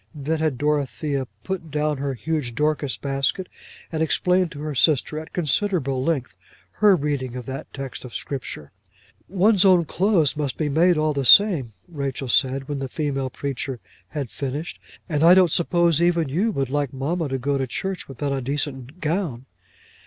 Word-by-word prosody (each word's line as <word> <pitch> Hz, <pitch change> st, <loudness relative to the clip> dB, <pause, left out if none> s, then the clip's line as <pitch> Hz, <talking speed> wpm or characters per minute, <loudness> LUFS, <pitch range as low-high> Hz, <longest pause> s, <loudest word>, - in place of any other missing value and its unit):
Then 155 Hz, +2 st, -2 dB
had 155 Hz, -5 st, 0 dB
Dorothea 145 Hz, -1 st, -1 dB, 0.2 s
put 185 Hz, -4 st, -4 dB
down 150 Hz, -1 st, -1 dB
her 140 Hz, -1 st, -2 dB
huge 145 Hz, -3 st, -3 dB
Dorcas 150 Hz, -2 st, 0 dB
basket, 140 Hz, +6 st, -1 dB, 0.4 s
and 160 Hz, -1 st, -2 dB
explained 180 Hz, +2 st, +2 dB
to 145 Hz, -, -8 dB
her 155 Hz, 0 st, -3 dB
sister, 150 Hz, +2 st, +2 dB
at 160 Hz, -, -10 dB
considerable 155 Hz, -5 st, 0 dB
length, 140 Hz, -5 st, -1 dB, 0.4 s
her 210 Hz, -2 st, +5 dB
reading 140 Hz, -5 st, -2 dB
of 125 Hz, -2 st, -6 dB
that 135 Hz, 0 st, -7 dB
text 135 Hz, -2 st, -7 dB
of 125 Hz, -, -10 dB
Scripture. 120 Hz, -, -6 dB, 0.6 s
"One's 195 Hz, +1 st, +4 dB
own 185 Hz, -3 st, +5 dB
clothes 170 Hz, -4 st, +2 dB
must 145 Hz, -3 st, -3 dB
be 155 Hz, -2 st, -1 dB
made 170 Hz, +4 st, +4 dB
all 155 Hz, 0 st, +1 dB
the 140 Hz, -1 st, -1 dB
same," 150 Hz, -, +6 dB
Rachel 140 Hz, -5 st, -4 dB
said 135 Hz, +2 st, +2 dB
when 145 Hz, -2 st, -3 dB
the 135 Hz, -1 st, -4 dB
female 135 Hz, -2 st, -2 dB
preacher 135 Hz, -1 st, -4 dB, 0.3 s
had 140 Hz, -6 st, -5 dB
finished. 145 Hz, +4 st, -5 dB, 0.3 s
"And 150 Hz, -3 st, 0 dB
I 175 Hz, +2 st, +8 dB
don't 185 Hz, -3 st, +5 dB
suppose 170 Hz, -1 st, +2 dB
even 170 Hz, -3 st, +2 dB
you 185 Hz, +11 st, +1 dB
would 135 Hz, -, -2 dB
like 145 Hz, -2 st, 0 dB
mamma 150 Hz, +4 st, -2 dB
to 135 Hz, -, -1 dB
go 140 Hz, +2 st, -1 dB
to 135 Hz, -, -1 dB
church 190 Hz, +8 st, -4 dB
without 140 Hz, +1 st, -3 dB
a 135 Hz, -, -2 dB
decent 140 Hz, +2 st, -4 dB
gown." 155 Hz, -6 st, -2 dB
145 Hz, 175 wpm, -23 LUFS, 135-165 Hz, 0.6 s, I